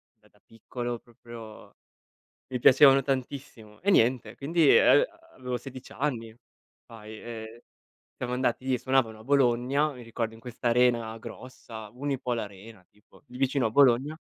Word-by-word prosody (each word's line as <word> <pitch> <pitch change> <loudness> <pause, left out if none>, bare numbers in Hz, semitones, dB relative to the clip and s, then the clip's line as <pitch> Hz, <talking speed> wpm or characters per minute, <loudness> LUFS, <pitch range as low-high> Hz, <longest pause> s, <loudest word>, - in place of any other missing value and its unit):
da - - -27
da - - -30
piccolo, 120 +2 -6
proprio 115 -2 -13 0.8
mi 125 - -1
piacevano 135 +2 +7
tantissimo. 130 -5 -5
E 200 - +2
niente, 120 - +2
quindi, 155 +1 +3
ehm, - - +6 0.3
avevo 125 -1 -4
16 130 +1 -11
anni 115 -6 -3 0.5
fai, 110 -1 -11
ehm, 115 0 -8 0.6
siamo 125 -1 -3
andati 130 +1 0
suonavano 125 -4 0
a 110 - -14
Bologna, 135 +2 +2
mi 125 - -11
ricordo 115 -1 -4
in 115 - -15
questa 120 0 -4
arena 120 -2 +2
grossa, 115 -1 -10
Unipol 130 -2 -2
Arena 100 -1 -9
tipo, 105 +1 -24
lì 125 - -11
vicino 135 0 +1
a - - -1
Bologna, 135 +3 +4
120 Hz, 145 wpm, -27 LUFS, 115-130 Hz, 0.8 s, piacevano